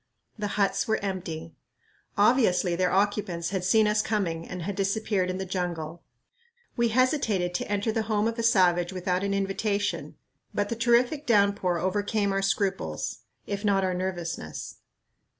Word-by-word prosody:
The 210 -2 -3
huts 200 -2 +1
were 220 - +2
empty. 170 -4 -4 0.6
Obviously 200 -5 +3
their 180 +1 +2
occupants 195 -3 0
had 190 -2 -2
seen 215 +4 +4
us 210 0 +2
coming 175 -7 -2
and 180 -1 -5
had 200 +2 -3
disappeared 195 -1 0
in 185 - -2
the 190 - -3
jungle. 175 -3 -3 0.7
We 235 0 +2
hesitated 225 - +1
to 180 - -3
enter 205 +2 0
the 225 - 0
home 210 0 +2
of 230 +1 -3
a - - +2
savage 180 -6 +3
without 185 0 -1
an 200 0 0
invitation, 200 +1 -1 0.4
but 205 0 0
the 230 - -1
terrific 245 +5 +2
downpour 200 -5 +3
overcame 205 +3 0
our 195 - +1
scruples, 195 - -1 0.3
if 200 +1 -4
not 200 -2 +2
our 185 -1 0
nervousness. 175 - -4
195 Hz, 155 wpm, -27 LUFS, 180-215 Hz, 0.7 s, seen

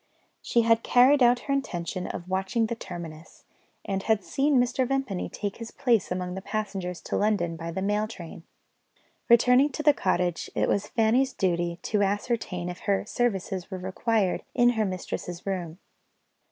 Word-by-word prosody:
She 235 - +2
had 230 0 +4
carried 260 +4 +5
out 245 0 +5
her 275 - -2
intention 180 -9 -3
of 175 - -6
watching 190 +5 0
the 220 - -2
terminus, 170 -6 -9 0.4
and 195 -1 -2
had 215 -1 +1
seen 275 +3 +2
Mr. 250 +1 +1
Vimpany 270 -8 -2
take 205 -1 -4
his 230 -1 -7
place 230 -9 +1
among 180 0 -2
the 190 - -5
passengers 195 -4 -4
to - - -4
London 200 -6 +1
by 165 +1 -6
the 190 +3 -3
mail 210 +2 +1
train. 180 -4 -9 0.9
Returning 250 +4 +5
to 305 - -4
the 295 -1 +6
cottage, 180 - -1
it - - +1
was 200 +1 0
Fanny's 245 +4 +2
duty 175 -2 0
to 210 -2 0
ascertain 200 -3 -1
if 180 0 -6
her 200 0 +2
services 195 -6 -2
were 190 - -5
required 190 +2 0
in 240 -1 +5
her 220 -3 +1
mistress's 180 -2 -5
room. 180 -4 -3
200 Hz, 165 wpm, -27 LUFS, 180-235 Hz, 0.9 s, the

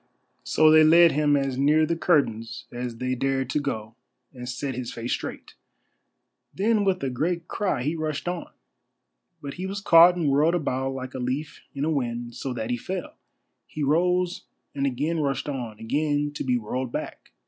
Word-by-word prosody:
So 155 0 +4
they 155 0 +7
led 165 +2 +7
him 145 -1 +2
as 135 -2 -1
near 150 +3 +4
the 170 - -1
curtains 140 -10 0
as 120 -1 -5
they 130 +1 -2
dared 135 0 -1
to 150 - +1
go 110 -6 -4 0.4
and 125 -1 -7
set 135 +1 -3
his 125 -1 -5
face 115 +1 -3
straight. - - -6 1.0
Then 210 +2 +1
with 190 -5 0
a 135 - -1
great 170 +6 -2
cry 190 -11 -1
he 150 +5 -1
rushed 155 0 -3
on. 175 -1 -3 0.9
But 140 -1 -5
he 190 - -2
was 200 +1 -4
caught 175 -2 +7
and 170 -4 -1
whirled 150 +5 +3
about 135 -4 -1
like 130 0 -6
a 130 - -5
leaf 130 +4 -3
in 140 +1 -1
a 160 - 0
wind, 120 -4 -2
so 135 - -5
that 120 -1 -3
he 120 - 0
fell. 185 +9 -5 0.5
He 150 - -5
rose 180 +4 +1 0.3
and 140 -1 0
again 150 +6 -1
rushed 140 -3 -1
on, 120 -7 -4
again 145 +4 0
to - - -4
be 125 -2 +1
whirled 125 +2 -4
back. - - -6
140 Hz, 185 wpm, -25 LUFS, 125-160 Hz, 1.0 s, they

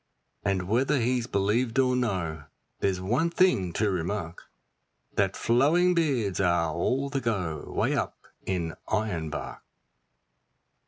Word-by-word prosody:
And 95 -2 0
whether 130 +7 +2
he's 125 0 0
believed 115 +5 0
or 130 -1 +3
no, 90 -11 -2 0.3
there's 95 -2 0
one 120 - +1
thing 170 - +2
to 105 +2 +1
remark, 90 -1 -4 0.6
That 100 -1 +1
flowing 155 +10 +3
beards 135 - +1
are 85 -4 +2
all 135 - 0
the 135 -2 -1
go 90 - -2
way - - +1
up - - -2 0.3
in 85 -4 -2
Ironbark. 90 -8 -2
105 Hz, 120 wpm, -27 LUFS, 90-130 Hz, 0.6 s, or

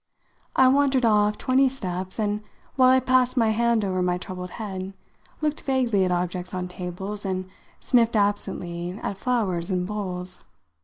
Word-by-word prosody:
I 260 - +6
wandered 265 -1 +3
off 210 -1 +3
twenty 265 +1 +3
steps 185 -7 -5
and, 210 -1 -1 0.3
while 255 -1 +6
I 260 0 +6
passed 255 0 +2
my 225 -2 +4
hand 230 -1 +2
over 185 -1 -1
my 180 0 +1
troubled 180 0 -7
head, 195 -3 -5 0.5
looked 305 -1 -1
vaguely 250 -7 +1
at 180 - 0
objects 180 +1 -2
on 180 0 -3
tables 180 +3 -6
and 185 -1 -2 0.3
sniffed 235 -2 +2
absently 185 -3 -1
at 200 - -2
flowers 195 -8 -1
in 180 -1 0
bowls. 185 -3 -5
205 Hz, 155 wpm, -25 LUFS, 185-245 Hz, 0.5 s, I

